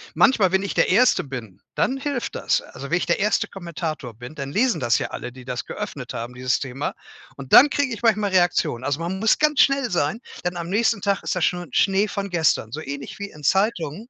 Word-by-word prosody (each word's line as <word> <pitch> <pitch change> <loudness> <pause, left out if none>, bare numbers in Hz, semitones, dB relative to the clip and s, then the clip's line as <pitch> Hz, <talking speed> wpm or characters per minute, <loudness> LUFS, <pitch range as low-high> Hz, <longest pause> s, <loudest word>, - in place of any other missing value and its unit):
Manchmal, 215 -9 +4
wenn 190 - +2
ich 200 - -4
der - - +3
1. 245 +7 +4
bin, 115 -8 -8
dann 265 - +1
hilft 275 -3 -3
das. - - +1
Also, 140 - -10
wenn 175 - +2
ich - - -2
der 170 - +1
1. 210 +1 +1
Kommentator 165 -8 -5
bin, 120 +6 -10
dann 140 -2 -6
lesen 240 - +2
das 120 -2 +2
ja - - -2
alle, 125 - -6
die 130 0 -12
das 125 -2 -4
geöffnet - - -6
haben, 120 +2 -5
dieses 125 +1 0
Thema 135 +2 -4 0.4
und 135 -2 -10
dann 285 - +9
krieg 285 -2 0
ich 225 - -7
manchmal 215 -3 +2
Reaktionen. 175 -8 +1
Also, 145 +1 -1
man 185 +3 -3
muss 225 +2 +3
ganz 300 -2 +2
schnell 275 -4 +2
sein, 180 +6 0 0.2
denn 180 - -1
am 170 -1 -5
nächsten 215 0 +1
Tag 200 -1 0
ist - - -2
das 180 - -1
schon 175 0 0
Schnee 195 +2 +3
von 200 -1 -4
gestern, 160 -10 +1
so 155 - -5
ähnlich 140 +5 -7
wie 200 0 -5
in 150 - -15
Zeitungen. 195 - 0
180 Hz, 230 wpm, -23 LUFS, 140-210 Hz, 0.4 s, dann